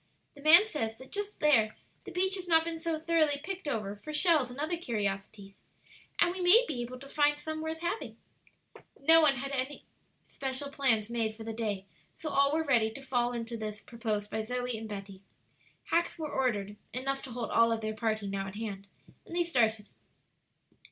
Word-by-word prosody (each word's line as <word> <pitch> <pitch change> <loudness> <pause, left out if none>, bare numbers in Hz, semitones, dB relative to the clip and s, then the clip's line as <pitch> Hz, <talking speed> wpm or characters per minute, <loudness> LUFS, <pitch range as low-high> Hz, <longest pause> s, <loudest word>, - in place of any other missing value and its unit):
The 285 - -14
man 325 +7 +8
says 225 - -3
that 260 +1 -13
just 410 0 -4
there 230 -8 +4 0.3
the - - -7
beach 375 +2 +1
has 370 -2 +1
not 325 -1 +5
been 330 0 -4
so 330 -1 -1
thoroughly 315 -3 +2
picked 380 -1 -5
over 210 -7 -2
for 305 +9 -8
shells 305 -4 +3
and 245 - -10
other 310 +4 -1
curiosities, 200 - -4 0.6
and 345 - +4
we 370 - -5
may 410 +8 +7
be 250 -5 -3
able 245 +1 -6
to 275 +2 -11
find 295 0 +2
some 315 0 -4
worth 320 +1 -4
having." 345 +6 -3 0.8
No 325 +4 +7
one 295 -3 +5
had 275 +2 -4
made 275 - -1
any 290 - -12 0.4
special 270 +1 -3
plans 260 -7 +3
for 225 -1 -3
the 225 0 -5
day, 210 -4 -3 0.3
so 310 - -5
all 280 0 +3
were 320 +1 +1
ready 235 -7 +3
to 220 - -9
fall 245 -2 0
into 235 0 -4
this 215 -1 -5
proposed 220 -4 -4
by 220 - -1
Zoe 245 +2 -2
and 220 0 -7
Betty. 195 -2 -8 0.7
Hacks 340 +1 +1
were 310 -2 -4
ordered 210 -6 -1 0.2
enough 270 +2 -2
to 260 - -9
hold 235 -1 -4
all 230 0 +4
of 225 -1 -1
their 215 0 -2
party 215 -1 -1
now 195 0 -3
at 195 - -8
hand 200 -3 -6 0.4
and 340 - -7
they 350 - +3
started. 225 -10 +1
255 Hz, 200 wpm, -30 LUFS, 220-315 Hz, 0.8 s, man